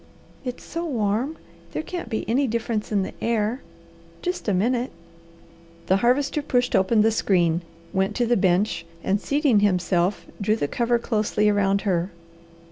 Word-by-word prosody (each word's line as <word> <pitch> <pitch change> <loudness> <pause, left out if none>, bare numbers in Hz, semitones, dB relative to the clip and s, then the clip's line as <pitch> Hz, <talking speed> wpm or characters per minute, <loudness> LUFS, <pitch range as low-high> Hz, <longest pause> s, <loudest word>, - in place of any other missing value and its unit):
"It's 250 -2 -5
so 335 +1 -4
warm. 245 0 -1 0.4
There - - -2
can't 345 -8 -5
be 220 - -3
any 260 +5 +2
difference 225 -2 -2
in 200 -2 +2
the - - -6
air. 230 +2 0 0.6
Just 360 -7 -3
a - - +3
minute." 240 +6 +1 0.9
The 190 - +3
Harvester 275 +6 +2
pushed 245 -3 +1
open 210 +3 +4
the 225 - +4
screen, 175 -6 +2 0.3
went 195 +2 0
to 245 - +1
the 240 +1 +3
bench, 190 -1 +2 0.2
and 200 +2 +1
seating 285 -6 +3
himself, 180 -1 +1 0.2
drew 210 +2 +2
the 145 - -1
cover 235 +7 +1
closely 210 -2 +1
around 200 -1 +2
her. 180 -2 0
215 Hz, 155 wpm, -24 LUFS, 195-245 Hz, 0.9 s, open